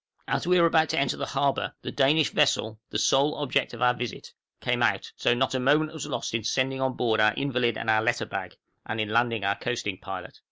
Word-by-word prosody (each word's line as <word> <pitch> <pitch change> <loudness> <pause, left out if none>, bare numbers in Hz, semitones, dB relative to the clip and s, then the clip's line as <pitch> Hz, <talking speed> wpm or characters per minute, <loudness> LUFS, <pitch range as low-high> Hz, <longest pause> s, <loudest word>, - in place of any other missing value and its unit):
As - - -1
we 180 0 +4
were 170 - +5
about 160 -1 +3
to - - +1
enter 140 -2 0
the - - -4
harbor, 140 0 -1
the - - -4
Danish 145 +2 +3
vessel 110 0 +1
the - - -2
sole 135 +6 +3
object 145 -3 -1
of 120 - -3
our 125 0 +5
visit 125 -3 -6 0.3
came - - -1
out, - - +1
so 120 - +2
not 130 +2 0
a 130 - 0
moment 150 +4 +2
was 160 - -6
lost - - -4
in 115 -1 -1
sending 130 +3 0
on 130 -1 0
board 115 -3 0
our 105 0 +4
invalid 125 -5 0
and - - -5
our 110 -1 +4
letter 120 +2 0
bag, - - -6 0.3
and 110 - -4
in 110 -1 -1
landing 115 -1 +1
our 100 +1 +2
coasting 105 -6 -3
pilot. 95 -2 -8
125 Hz, 235 wpm, -26 LUFS, 110-140 Hz, 0.3 s, were